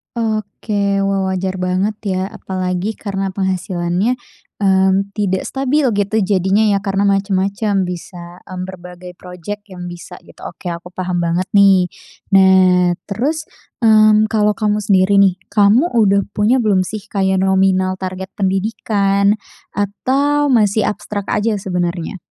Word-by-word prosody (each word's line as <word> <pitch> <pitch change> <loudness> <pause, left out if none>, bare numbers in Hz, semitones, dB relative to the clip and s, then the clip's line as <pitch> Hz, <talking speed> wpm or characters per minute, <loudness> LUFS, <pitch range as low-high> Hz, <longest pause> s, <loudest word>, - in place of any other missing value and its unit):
Oke. 210 -2 -1
Wah 195 -1 0
wajar 190 0 -2
banget 185 +3 -1
ya, 190 -1 -1
apalagi 185 +2 -4
karena 195 -2 -3
penghasilannya, 185 +3 -1 0.4
mmm, 190 +1 +2
tidak 190 -3 -1
stabil 270 +1 0
gitu 205 +2 0
jadinya 195 +2 +2
ya 200 -1 +1
karena 195 0 0
macam-macam, 200 +1 0
bisa, 175 0 -9
mmm, 185 -1 -7
berbagai 180 -1 -10
projek 180 +4 -8
yang 180 -1 -7
bisa 175 +1 -10
gitu. - - -17
Oke 175 - -8
aku 170 +1 -6
paham 180 -1 -2
banget 170 +3 -1
nih. 195 -2 +5 0.5
Nah 185 -2 +5 0.2
terus, 285 +10 -2 0.3
mmm, 215 -1 +5
kalau 210 -1 +2
kamu 210 -1 -1
sendiri 195 0 +3
nih, 195 -2 +4
kamu 210 +9 +3
udah 200 -3 +3
punya 225 +5 +2
belum 200 -5 +2
sih 215 +2 -7
kayak 190 -2 0
nominal 190 -1 +2
target 185 0 -6
pendidikan 200 0 0 0.3
atau 275 +8 0
masih 215 -2 +2
abstrak 205 -1 -6
aja 210 +1 +1
sebenernya? 180 -1 -3
195 Hz, 130 wpm, -17 LUFS, 185-210 Hz, 0.5 s, nih